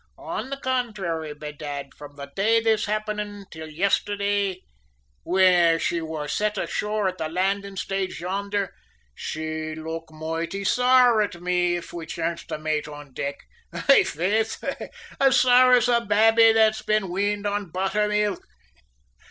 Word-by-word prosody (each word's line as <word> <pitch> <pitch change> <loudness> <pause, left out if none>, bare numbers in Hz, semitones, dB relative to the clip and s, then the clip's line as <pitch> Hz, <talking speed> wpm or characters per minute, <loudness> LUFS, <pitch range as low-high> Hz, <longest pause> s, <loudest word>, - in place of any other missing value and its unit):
On - - -5
the 275 - -4
contrary, 210 - -2
bedad, 145 -2 -7
from 145 -1 -12
the 140 -1 -7
day 225 +4 +3
this 225 -1 +1
happened 210 -1 -3
till 160 0 -8
yestherday, 200 +2 0 0.6
whin 180 -2 +4
she 170 0 -1
wor 160 -2 -5
set 210 +7 -1
ashore 210 -1 -1
at 185 0 -4
the 155 - -2
landing 195 +3 -1
stage 195 0 -3
yonder, 200 +2 -2 0.4
she'd 155 - -4
look 160 +1 -6
moighty 165 +5 -4
saur 250 0 +4
at 195 -4 -2
me 175 0 +1
if 175 - -7
we 165 -2 -6
chanced 170 0 -3
to - - -4
mate 155 -1 -2
on 145 -2 -11
deck 140 +2 -3 0.4
aye, - - +5
faith, 210 +8 -1 0.6
as 270 -1 +5
saur 250 0 +6
as 245 -1 +5
a 240 -1 +3
babby 225 +1 +5
that's 220 -1 +3
been 215 -3 0
weaned 205 +2 -1
on 205 -3 -2
butthermilk." 210 +2 0
195 Hz, 145 wpm, -24 LUFS, 165-215 Hz, 0.6 s, saur